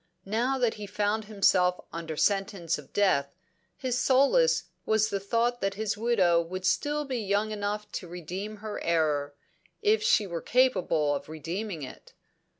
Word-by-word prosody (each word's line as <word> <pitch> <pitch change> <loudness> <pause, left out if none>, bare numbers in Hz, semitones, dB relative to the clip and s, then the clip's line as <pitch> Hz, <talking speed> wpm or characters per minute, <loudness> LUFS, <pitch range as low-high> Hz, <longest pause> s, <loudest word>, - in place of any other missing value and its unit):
Now 235 +7 0
that 245 -3 +1
he 205 - -5
found 210 +2 -1
himself 185 -4 +3
under 165 -2 -5
sentence 195 -5 0
of 145 - -14
death, 140 -9 +1 0.4
his 250 -2 -1
solace 280 - +4 0.2
was 220 0 +2
the 200 - 0
thought 235 +4 0
that 195 0 -1
his 215 0 -1
widow 200 -7 +3
would 185 +2 -6
still 295 +10 +1
be 260 -3 -3
young 205 +1 0
enough 210 0 -3
to 180 - -5
redeem 180 +5 -6
her 215 - -4
error 150 -4 +1 0.5
if 435 +1 +3
she 425 - +3
were 170 -3 -4
capable 185 - +2
of 145 - -5
redeeming 165 +2 -5
it. 130 - -11
205 Hz, 155 wpm, -28 LUFS, 170-225 Hz, 0.5 s, solace